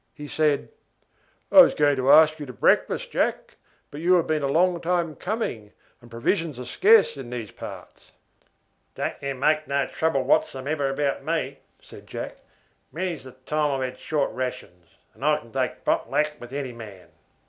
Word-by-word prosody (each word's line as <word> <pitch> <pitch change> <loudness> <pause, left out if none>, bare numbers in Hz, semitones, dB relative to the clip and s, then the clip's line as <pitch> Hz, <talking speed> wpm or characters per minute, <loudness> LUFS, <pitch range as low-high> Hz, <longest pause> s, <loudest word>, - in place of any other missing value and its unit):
He 150 -1 -8
said: 150 -1 0 0.8
"I 290 - +8
am 275 - +10
going 145 -1 +3
to 130 +1 +3
ask 155 0 +6
you 145 - -6
to 125 - -8
breakfast, - - +1
Jack; - - -1 0.3
but 145 - -8
you 180 +2 +4
have 170 - +2
been 155 -1 0
a 140 - 0
long 170 +4 +2
time 170 -2 -1
coming, 180 - -4 0.3
and 120 - -16
provisions 145 - -1
are 125 - -7
scarce 425 - +4
in 130 -3 -8
these 120 -4 -6
parts." - - -11 0.8
"Don't - - -2
you 140 -1 -3
make 155 +3 +1
no 140 -1 +1
trouble 150 -3 0
whatsomever 140 +2 0
about 140 +1 -1
me," - - -2 0.2
said - - -15
Jack. - - -6 0.5
"Many's 175 -3 -4
the 130 - -11
time 145 +1 -1
I've 130 -1 -3
hadshort 145 +2 -2
rations, 110 -10 -6 0.2
and - - -13
I - - +3
can - - -13
take - - -3
pot - - 0
luck 150 0 +1
with 120 0 -11
any 135 -2 -4
man." 105 -6 -11
140 Hz, 175 wpm, -25 LUFS, 130-155 Hz, 0.8 s, am